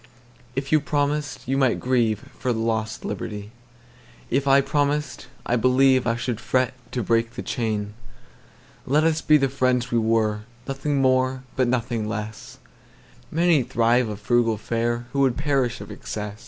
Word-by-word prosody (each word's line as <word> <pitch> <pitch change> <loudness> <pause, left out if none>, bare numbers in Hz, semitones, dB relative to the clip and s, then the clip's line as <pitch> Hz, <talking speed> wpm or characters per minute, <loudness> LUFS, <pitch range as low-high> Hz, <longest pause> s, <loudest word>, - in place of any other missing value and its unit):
If 135 +1 -3
you 155 - +6
promised, 145 -2 -2
you 135 +1 +1
might 130 -3 +2
grieveFor 120 -1 -1
lost 110 -1 -2
liberty 105 0 -5 0.8
again:If 140 +2 +1
I 135 0 +6
promised, 145 +1 -1 0.2
I 120 - +1
believeI 130 -1 +3
should 120 -2 -3
fret 130 +2 +1 0.2
to 125 - -1
break 115 +2 +1
the - - -5
chain. 105 -3 -2 0.9
Let 150 +4 +3
us 160 -1 +2
be 155 - +5
the 135 -2 +2
friends 125 -2 0
we 120 - +3
were, 110 -1 +1 0.3
Nothing 135 0 -1
more 130 0 +2
but 130 -2 +2
nothing 120 -3 -1
less:Many 115 - -3
thrive 120 -1 +2
on 105 - -4
frugal 115 +1 +1
fareWho 120 +2 -2
would 135 -3 +3
perish 135 -5 0
of 100 +1 -9
excess. 105 0 -6
125 Hz, 140 wpm, -24 LUFS, 115-135 Hz, 0.9 s, you